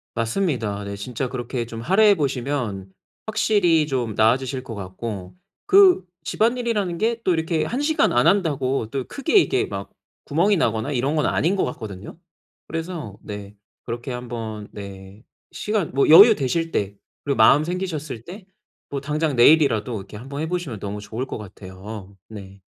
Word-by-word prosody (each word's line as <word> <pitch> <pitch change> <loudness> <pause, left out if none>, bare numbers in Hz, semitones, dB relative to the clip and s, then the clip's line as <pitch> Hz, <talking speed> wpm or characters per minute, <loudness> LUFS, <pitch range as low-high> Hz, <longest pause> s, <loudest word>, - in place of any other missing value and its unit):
맞습니다. 115 - -1
네 100 0 -5
진짜 125 +5 -4
그렇게 120 -1 -4
좀 115 0 -8
할애해 200 - +5
보시면 125 - -2 0.4
확실히 200 -7 +2
좀 125 -6 -2
나아지실 130 +4 +2
것 120 -3 -8
같고 95 0 -6 0.3
그 390 - +6 0.2
집안일이라는 225 -6 0
게 230 +3 0
또 185 - +3
이렇게 160 -1 0
1 240 - -3
시간 305 +2 +2
안 120 +1 +3
한다고 140 - +1
또 135 0 -3
크게 285 - -1
이게 390 +1 +2
막 - - -6 0.3
구멍이 180 +8 +2
나거나 115 -1 0
이런 135 +4 0
건 150 - +2
아닌 180 +5 +1
것 - - +1
같거든요. 105 - -7 0.5
그래서 165 - -5
네 105 -1 -8 0.3
그렇게 120 +2 -5
한번 115 -4 -6
네 100 0 -10 0.3
시간 210 -5 -2
뭐 140 - +3
여유 205 +8 +10
되실 165 +5 -1
때 100 0 -1 0.3
그리고 140 - 0
마음 150 +2 +6
생기셨을 155 -9 -4
때 190 - -10 0.4
뭐 140 - -3
당장 150 0 -1
내일이라도 120 -4 +4
이렇게 100 +1 -8
한번 140 +5 -6
해 - - -1
보시면 175 -11 -3
너무 100 +1 -5
좋을 110 +5 -5
것 - - -6
같아요. 100 0 -10
네. 100 -3 -11
130 Hz, 320 characters per minute, -22 LUFS, 110-170 Hz, 0.5 s, 여유